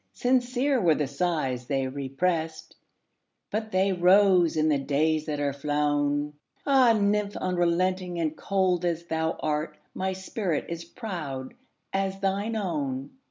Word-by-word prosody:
Sincere 250 +1 +1
were 165 -4 +4
the 150 - 0
sighs 140 -4 -1
they 135 -2 0
represt, 160 +5 -2 0.8
But 215 +1 -2
they 190 0 +2
rose 180 -2 +5
in 155 0 +3
the 145 -2 +2
days 155 +3 +1
that 150 -1 -2
are 140 -1 0
flown! 145 0 0 0.3
Ah, 265 -4 +5
nymph! 205 -1 +1
unrelenting 180 0 0
and 160 -2 -1
cold 185 -1 +1
as 170 -1 -1
thou 160 -1 -1
art, 150 0 -2 0.2
My 190 0 -2
spirit 190 -3 -2
is 170 0 -5
proud 165 - -6 0.4
as 195 0 -1
thine 200 +3 -1
own! 145 -9 -2
170 Hz, 135 wpm, -27 LUFS, 150-195 Hz, 0.8 s, rose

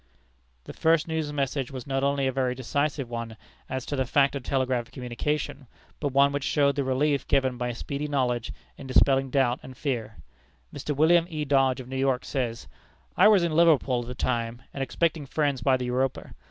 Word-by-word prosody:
This - - -11
first 165 0 +3
news 160 -2 -2
message 140 -2 -2
was 130 -3 -7
not 135 -1 -1
only 140 0 +1
a 130 - +1
very 130 -1 -1
decisive 140 +2 -1
one 115 -1 -6 0.3
as 130 -1 -3
to 145 - -3
the 130 -2 -1
fact 140 +1 +3
of 140 - -3
telegraphic 125 -2 -1
communication, 130 +2 -3 0.3
but 145 - -1
one 140 +1 +4
which 145 -1 -2
showed 140 -1 +2
the 140 - 0
relief 140 +2 0
given 130 -2 +2
by 120 0 -2
speedy 140 +5 -4
knowledge 125 -4 -1 0.3
in 135 - -9
dispelling 135 +1 +3
doubt 130 -2 +1
and 130 -1 -11
fear. 115 -7 -3 0.6
Mr. 145 +1 -4
William 165 +3 +4
E. 155 -3 -3
Dodge, 135 -2 +2
of 125 - -8
New 130 +1 -5
York, 130 -1 0
says: 120 -4 -3 0.5
"I - - +6
was 205 -4 +5
in 170 - 0
Liverpool 150 -7 +4
at 120 - -9
the 125 - -6
time, 120 0 -2
and 135 - -5
expecting 155 +2 -1
friends 145 -3 0
by 130 +2 +3
the 125 - -4
Europa. 125 +1 -2
135 Hz, 195 wpm, -26 LUFS, 125-145 Hz, 0.6 s, I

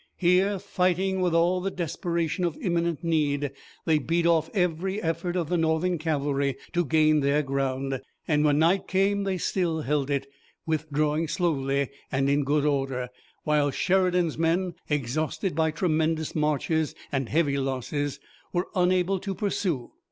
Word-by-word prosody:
Here, 185 +3 +3
fighting 190 0 0
with 175 -2 +1
all 175 +2 +3
the 195 - -1
desperation 170 0 -2
of 170 -3 -1
imminent 170 -3 -1
need, 145 -4 +1 0.3
they 160 -2 +3
beat 165 +4 0
off 165 -2 +3
every 185 +1 0
effort 170 0 -2
of 175 -4 0
the 175 +2 0
Northern 165 +2 +1
cavalry 140 -3 0 0.2
to 175 - +2
gain 155 0 +4
their 145 +1 +2
ground, 135 -1 -2 0.3
and 150 -1 +2
when 145 -1 +3
night 170 +5 +3
came 195 +1 +1
they 190 -1 0
still 170 -2 0
held 145 -1 0
it, 140 -1 0 0.4
withdrawing 155 0 0
slowly 140 -5 0 0.2
and 135 +1 +1
in 145 +1 +2
good 145 +1 +1
order, 135 -4 -1 0.3
while 150 -1 +2
Sheridan's 180 -1 +1
men, 170 +2 +1 0.2
exhausted 150 - -1
by 160 +1 +2
tremendous 160 -1 0
marches 155 +1 0 0.2
and 135 -3 -1
heavy 145 -3 +1
losses, 135 +2 -2 0.3
were 175 +1 -1
unable 185 0 +2
to 195 +1 -4
pursue. 180 - -2
160 Hz, 150 wpm, -26 LUFS, 145-180 Hz, 0.4 s, gain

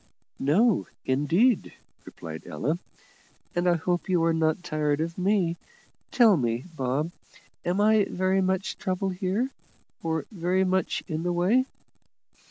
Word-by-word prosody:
"No, 190 - +3 0.2
indeed," 170 - +2 0.3
replied 80 -1 -9
Ella; 150 - -2 0.7
"and 175 +1 +2
I 175 - +4
hope 175 +3 -1
you 175 -3 +3
are 165 0 +3
not 160 +1 +1
tired 150 -3 0
of 165 +1 -2
me. 185 -3 +1 0.5
Tell 225 -7 +5
me, 120 -2 -1
Bob, 135 +4 -1 0.5
am 180 +3 0
I 215 0 +4
very 185 +1 +1
much 190 +1 -1
trouble 190 0 -1
here, 195 +7 -1 0.5
or 160 -2 -1
very 185 -1 +1
much 185 0 0
in 160 -3 -3
the 175 +1 -1
way?" 200 +10 +2
175 Hz, 135 wpm, -27 LUFS, 160-190 Hz, 0.7 s, Tell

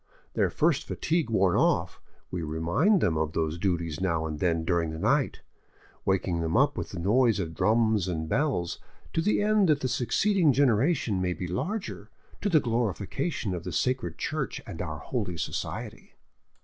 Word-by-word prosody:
Their - - +2
first 155 -2 +1
fatigue 165 -4 -1
worn 95 -5 +3
off, - - +1 0.3
we 90 - -3
remind 85 - +2
them 80 -5 +1
of 80 0 -1
those 80 0 -1
duties 85 -3 -1
now 85 -4 0
and 75 -1 -4
then 80 -2 +1
during 85 -2 +1
the 80 - -5
night, - - +1 0.6
waking 95 -3 +1
them 80 0 0
up - - +3
with - - -4
the - - -7
noise 110 +5 +3
of 80 -4 -3
drums 110 0 +2
and 80 -3 -2
bells, 125 - 0 0.3
to 165 - +1
the 205 +3 +2
end 210 -3 +3
that 150 -1 +3
the 130 - 0
succeeding 165 - +2
generation 125 - +2
may 90 -1 0
be 90 - -5
larger, 190 - -4 0.3
to 205 - 0
the 165 -5 +5
glorification 115 - -2
of 85 -2 -4
the - - -5
Sacred 130 0 -1
Church 155 -3 -3
and 100 -8 -7
our 80 -4 -4
Holy 95 - -3
Society." 80 - -5
100 Hz, 175 wpm, -28 LUFS, 85-140 Hz, 0.6 s, the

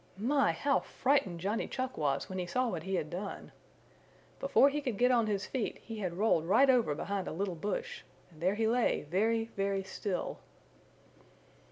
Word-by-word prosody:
My, 275 +7 +2
how 280 -1 +1
frightened 210 -11 0
Johnny 205 +5 -1
Chuck 255 0 -3
was 140 -3 0
when 185 0 -5
he 180 - -3
saw 255 +6 0
what 175 -6 -3
he 190 +3 -2
had 155 -4 -2
done! 195 +3 -6 0.9
Before - - +5
he 295 +1 0
could 250 -7 -3
get 250 +3 +4
on 235 -3 +3
his 200 -2 -1
feet 255 -5 -3
he 225 -1 -8
had 180 -4 -3
rolled 195 -6 +2
right 265 +8 +6
over 230 - +2
behind 200 +4 -3
a - - -3
little 185 +3 -2
bush, 185 +4 -4 0.3
and 155 -1 -17
there 185 +4 +2
he 220 +1 0
lay 240 +1 +2
very, 225 +8 0
very 195 0 0
still. 190 0 -4
200 Hz, 185 wpm, -32 LUFS, 185-245 Hz, 0.9 s, right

